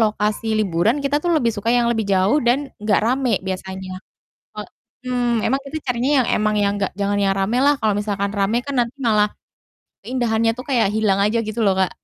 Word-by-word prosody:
lokasi 215 Hz, 0 st, 0 dB
liburan 205 Hz, -, +1 dB
kita 280 Hz, +1 st, +1 dB
tuh 350 Hz, -, -1 dB
lebih 235 Hz, -6 st, +1 dB
suka 210 Hz, +1 st, -4 dB
yang 240 Hz, 0 st, +3 dB
lebih 220 Hz, -1 st, -1 dB
jauh 195 Hz, +10 st, +3 dB
dan 245 Hz, +3 st, +4 dB, 0.2 s
gak 210 Hz, -1 st, +2 dB
rame 255 Hz, +2 st, +1 dB, 0.2 s
biasanya. 190 Hz, 0 st, -5 dB, 1.2 s
Mhm. 245 Hz, -2 st, 0 dB
Emang 270 Hz, -, +1 dB
kita 290 Hz, +3 st, -6 dB
carinya 250 Hz, +2 st, 0 dB
yang, 245 Hz, -, +1 dB
emang 215 Hz, 0 st, +1 dB
yang 200 Hz, 0 st, +1 dB
gak 195 Hz, -, -1 dB
jangan 200 Hz, 0 st, 0 dB
yang 195 Hz, -, +2 dB
rame 205 Hz, +5 st, 0 dB
lah, 290 Hz, 0 st, +4 dB
kalau 215 Hz, -1 st, +1 dB
misalkan 200 Hz, -1 st, -2 dB
rame 200 Hz, +3 st, +1 dB
kan 280 Hz, -1 st, -4 dB
nanti 240 Hz, +2 st, -1 dB
malah 215 Hz, -4 st, +2 dB, 0.7 s
keindahannya 230 Hz, -1 st, 0 dB
tuh 255 Hz, -, -7 dB
kayak 240 Hz, -7 st, +2 dB
hilang 215 Hz, -3 st, +1 dB
aja, 220 Hz, +3 st, +1 dB
gitu 215 Hz, +2 st, -4 dB
loh 195 Hz, -2 st, +3 dB
Kak. 190 Hz, -1 st, +1 dB
220 Hz, 195 wpm, -20 LUFS, 200-245 Hz, 1.2 s, dan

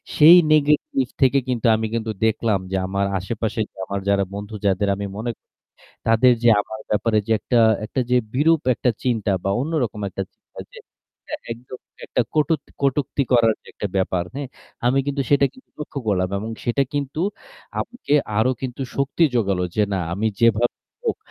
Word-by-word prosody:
সেই 160 Hz, +3 st, +9 dB, 0.2 s
negative 155 Hz, -, +2 dB
থেকে 135 Hz, +1 st, +5 dB
কিন্তু 125 Hz, -2 st, -1 dB
আমি 110 Hz, 0 st, -1 dB
কিন্তু 115 Hz, -1 st, -1 dB
দেখলাম 110 Hz, -2 st, +1 dB
যে 95 Hz, -, +1 dB
আমার 100 Hz, +1 st, 0 dB
আশেপাশের 110 Hz, +3 st, -2 dB, 0.2 s
আমার 100 Hz, +1 st, -3 dB
যারা 100 Hz, -1 st, +3 dB
বন্ধু 105 Hz, +2 st, -6 dB
যাদের 100 Hz, +1 st, +2 dB
আমি 100 Hz, +1 st, -4 dB
মনে, 110 Hz, +3 st, -3 dB, 0.8 s
তাদের 115 Hz, +3 st, +5 dB
যে 120 Hz, -, +5 dB
আমার 110 Hz, +1 st, -7 dB
ব্যাপারে 110 Hz, +1 st, +2 dB
যে 115 Hz, -, +1 dB
একটা 120 Hz, -, +1 dB, 0.3 s
একটা 125 Hz, +4 st, -2 dB
যে 125 Hz, -, +4 dB, 0.2 s
বিরূপ 160 Hz, +4 st, +3 dB
একটা 125 Hz, +2 st, +1 dB
চিন্তা 115 Hz, -5 st, 0 dB
বা 100 Hz, -, +1 dB
অন্যরকম 135 Hz, -7 st, -1 dB
একটা 95 Hz, -, -4 dB
চিন্তা -, -, -20 dB
যে 485 Hz, -, -13 dB, 0.4 s
এটা -, -, -7 dB, 0.2 s
একদম 125 Hz, +2 st, -10 dB, 0.3 s
একটা -, -, -1 dB
কটূক 155 Hz, +1 st, +2 dB, 0.2 s
কটূক্তি 140 Hz, 0 st, +1 dB
করার 115 Hz, -2 st, +5 dB
যে -, -, -29 dB
একটা 105 Hz, -, -3 dB
ব্যাপার, 95 Hz, -2 st, 0 dB
হ্যাঁ? 140 Hz, -1 st, -4 dB, 0.4 s
আমি 130 Hz, +2 st, +3 dB
কিন্তু 140 Hz, -1 st, -1 dB
সেটা 140 Hz, -1 st, +5 dB
কিন্তু 260 Hz, -, -20 dB
লক্ষ্য 150 Hz, -1 st, -5 dB
করলাম 95 Hz, -2 st, +1 dB
এবং 110 Hz, +3 st, -5 dB
সেটা 120 Hz, +4 st, +2 dB
কিন্তু 145 Hz, +1 st, -2 dB, 0.6 s
আমাকে 245 Hz, -, -5 dB, 0.3 s
আরও 125 Hz, +4 st, +3 dB
কিন্তু 130 Hz, +1 st, -4 dB
শক্তি 140 Hz, +4 st, 0 dB
জোগালো 100 Hz, -6 st, +1 dB
যে 105 Hz, -, +4 dB
না 95 Hz, -, 0 dB
আমি 100 Hz, +5 st, -1 dB
যেভাবেই 115 Hz, +1 st, +2 dB, 0.2 s
হোক 450 Hz, -, 0 dB
120 Hz, 170 wpm, -22 LUFS, 105-140 Hz, 0.8 s, সেই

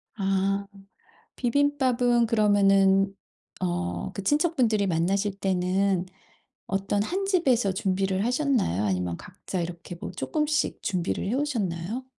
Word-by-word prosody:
아. 195 Hz, 0 st, 0 dB, 0.7 s
비빔밥은 250 Hz, -2 st, +2 dB
그러면은 195 Hz, -3 st, +4 dB, 0.5 s
어 90 Hz, 0 st, -2 dB
그 195 Hz, -, -5 dB
친척분들이 255 Hz, -, +2 dB
만나실 195 Hz, +4 st, 0 dB
때는 185 Hz, 0 st, +1 dB, 0.6 s
어떤 195 Hz, +1 st, 0 dB
1 380 Hz, -, -2 dB
집에서 265 Hz, -, +2 dB
준비를 190 Hz, 0 st, 0 dB
하셨나요? 250 Hz, -, +1 dB
아니면 90 Hz, -3 st, -1 dB
각자 185 Hz, -, -6 dB
이렇게 170 Hz, +1 st, -7 dB
뭐 -, -, -5 dB
쪼끔씩 305 Hz, 0 st, -1 dB
준비를 185 Hz, -2 st, -2 dB
해오셨나요? 225 Hz, -, -2 dB
195 Hz, 260 characters per minute, -26 LUFS, 185-245 Hz, 0.7 s, 그러면은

